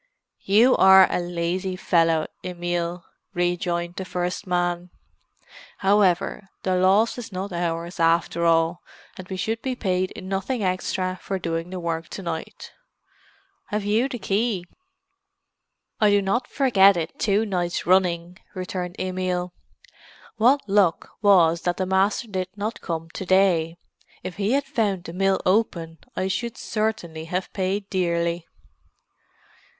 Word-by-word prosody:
"You 225 +6 +5
are 190 0 +8
a - - 0
lazy 175 +2 -2
fellow, 165 -3 +2 0.2
Emil," 175 -1 -3 0.3
rejoined 175 0 -1
the 190 - -3
first 180 +2 -3
man. 175 0 -1 0.9
"However, 195 -1 +2
the 185 -1 +1
loss 195 +6 +3
is 230 -2 -8
not 190 +1 -5
ours, 170 0 -3
after 165 0 +2
all, 165 +1 +2 0.3
and 185 -1 -9
we 190 - -5
should 225 +4 -2
be 260 -1 -2
paid 185 -5 -1
nothing 195 +5 -2
extra 185 0 -1
for 195 - -3
doing 165 -1 -3
the 185 0 -5
work 165 -1 -3
to 195 - -8
night. 170 -2 -6 1.0
Have 210 -1 -2
you 220 +6 +2
the 255 - -4
key?" 205 -3 -1 1.3
"I 210 - +5
do 205 0 +4
not 200 +6 0
forget 200 -8 +4
it 160 -1 -4
two 210 +1 +2
nights 175 -4 -2
running," 180 0 +1 0.2
returned 180 -1 -4
Emil. 180 -1 -2 0.8
"What 250 +5 +3
luck 195 -4 +2
it - - -35
was 170 -5 +5
that 175 0 -1
the 185 - 0
master 190 +5 +1
did 185 -3 -3
not 210 +3 -4
come 165 -1 -4
to - - -6
day!—if 175 -1 -1
he 205 +4 0
had 280 0 +1
found 215 -9 -1
the 165 - -8
mill 195 +1 +2
open 175 -5 0 0.2
I 185 - -1
should 235 +6 -3
certainly 180 -8 -3
have 180 +3 -3
paid 195 +1 -1
dearly." 170 -2 0
185 Hz, 140 wpm, -24 LUFS, 175-200 Hz, 1.3 s, are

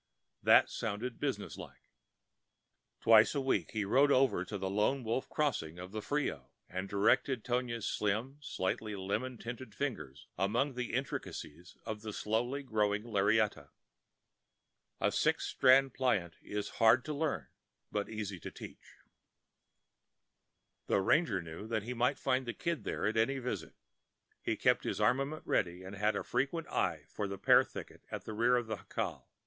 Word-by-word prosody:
That - - +6
sounded 115 +2 -4
business 135 -8 -3
like. - - -12 1.1
Twice 110 +4 +6
a - - +2
week 135 -1 0
he 105 -2 0
rode 140 +8 +4
over 130 -9 +3
to 100 +2 -5
the 95 0 -3
Lone 105 +7 +1
Wolf 115 +3 -2
Crossing 105 - -1
of 90 +1 -8
the 110 0 -4
Frio, 135 - -2 0.2
and 95 +1 -4
directed 110 +4 +2
Tonia's 120 -2 -1
slim, 110 +7 -1
slightly 105 -3 -2
lemon 105 +7 -2
tinted 120 -1 -7
fingers 80 - -4
among 115 +9 +1
the 125 -1 -4
intricacies 90 - -5
of 110 -2 -4
the 110 -1 -6
slowly 120 +8 -1
growing 105 -4 +1
lariata. 110 -1 +1 1.3
A - - +2
six - - +1
strand 135 0 +5
plait 105 -10 +1
is 105 0 -4
hard 115 +3 +6
to 155 - -3
learn 145 - -1 0.5
and 105 -1 -1
easy 105 -4 -4
to - - -6
teach. - - -12 1.9
The - - +3
ranger 100 - +2
knew 85 +6 -8
that 110 -2 -1
he 120 +3 -4
might 125 +1 +1
find 130 -1 0
the 120 - -3
Kid 170 -10 -2
there - - -2
at 110 +2 0
any 115 +5 +2
visit. 120 -8 -4 0.7
He - - -1
kept - - +3
his - - -2
armament 140 +4 +1
ready, 90 0 0
and 95 +2 -8
had 105 +1 +1
a - - -2
frequent 140 +6 -1
eye - - 0
for 105 - -3
the 100 0 -5
pear - - +6
thicket - - -9
at - - -6
the 110 - -5
rear 120 +3 +3
of 120 -1 +1
the 110 -1 -3
jacal. - - -4
110 Hz, 160 wpm, -33 LUFS, 100-130 Hz, 1.9 s, That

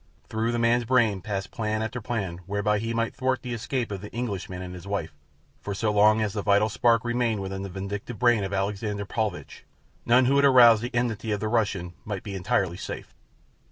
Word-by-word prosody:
Through 110 +1 -1
the 120 - -1
man's 120 +1 +3
brain 115 -6 +2
passed 95 0 -4
plan 110 -1 -2
after 115 +2 -4
plan 105 -7 -3
whereby 105 +1 +1
he 115 +2 -3
might 115 0 -1
thwart 130 0 -1
the 125 -1 -4
escape 120 0 -3
of 100 -2 -4
the 105 - -9
Englishman 100 -6 -4
and 90 0 -7
his 90 +1 -10
wife, 85 -6 -3 0.5
for 100 - -4
so 110 +1 0
long 105 +1 +4
as 105 -2 -2
the 105 - -2
vital 105 +1 +3
spark 115 +1 +2
remained 120 -2 0
within 95 0 -4
the 100 - -5
vindictive 100 +5 -5
brain 120 -4 +3
of 95 - -3
Alexander 100 +1 -2
Paulvitch 110 0 -4 0.4
none 125 +2 +4
who 135 +3 +3
had 140 - +5
aroused 120 -5 +7
the 120 +1 -5
enmity 115 -2 -1
of 105 - 0
the 110 - -2
Russian 100 -6 0
might 100 -3 -5
be 100 - -6
entirely 95 -2 0
safe. - - -7
110 Hz, 210 wpm, -26 LUFS, 100-120 Hz, 0.5 s, aroused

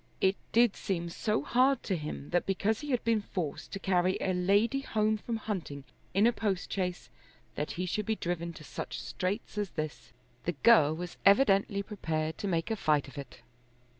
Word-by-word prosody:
It 190 0 +3 0.2
did 235 -2 +4
seem 170 -3 -2
so 215 +5 -1
hard 260 +1 +3
to 190 - 0
him 150 -3 -6
that 175 0 +1
because 205 +3 +1
he 295 - -7
had 250 -4 +1
been 230 -2 +2
forced 175 -7 -4
to 195 - -3
carry 185 -1 +2
a 190 - 0
lady 200 +8 +2
home 215 -4 +1
from 225 +2 -3
hunting 180 -10 -4 0.3
in 200 +3 +5
a 240 - +5
postchaise, 185 -3 -2 0.4
that 150 - -3
he 180 - -2
should 205 +3 -2
be 220 - +1
driven 170 -3 -3
to 155 - -11
such - - -6
straits 200 +3 -3
as 205 -2 -1
this! 155 -7 -5 0.3
The 175 - 0
girl 160 -10 +6
was 175 +1 -6
evidently 200 -2 +4
prepared 160 -6 -3
to 205 - -2
make 170 +2 0
a - - +1
fight 150 -8 +1
of 135 - -12
it. 135 -3 -10
195 Hz, 190 wpm, -30 LUFS, 170-215 Hz, 0.4 s, girl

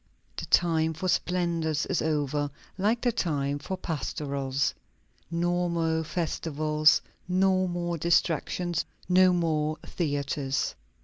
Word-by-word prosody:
The - - -5
time 160 -2 +3
for 185 +4 -3
splendors 170 -4 0
is 185 - 0
over, 145 -2 0 0.3
like 215 +5 +1
the 245 - +2
time 145 -8 -1
for 185 +6 -4
pastorals. 140 -4 -2 0.6
No 175 +1 0
more 165 -1 0
festivals, 155 -2 +2 0.2
no 185 0 +3
more 175 -1 -2
distractions, 170 +1 +1 0.2
no 185 0 +6
more 155 -3 0
theatres. 140 -3 -1
165 Hz, 110 wpm, -28 LUFS, 150-175 Hz, 0.6 s, no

